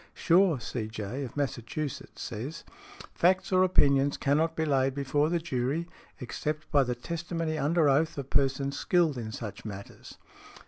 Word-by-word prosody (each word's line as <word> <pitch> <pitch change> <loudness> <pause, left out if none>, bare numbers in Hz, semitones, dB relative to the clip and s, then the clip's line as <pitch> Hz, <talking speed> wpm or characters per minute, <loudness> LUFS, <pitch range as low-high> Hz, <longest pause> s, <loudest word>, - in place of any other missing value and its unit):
Shaw, 175 -2 +4
C.J., 110 +2 -4
of 125 - -10
Massachusetts, 140 +1 -4
says, 125 +8 -6 0.5
"Facts 185 +3 +2
or 185 0 +4
opinions 140 -6 +3
cannot 155 +3 +1
be 160 - 0
laid 135 -2 +2
before 145 +2 +1
the 175 - +1
jury, 155 0 -2 0.3
except 150 +5 -4
by 140 -2 +5
the 125 -1 -2
testimony 165 +3 -3
under 155 +2 +2
oath 150 +4 +2
of 140 -1 -6
persons 140 0 +1
skilled 165 -7 +2
in 110 -2 -5
such 110 -2 -7
matters." 100 -2 -9
145 Hz, 145 wpm, -29 LUFS, 130-165 Hz, 0.5 s, by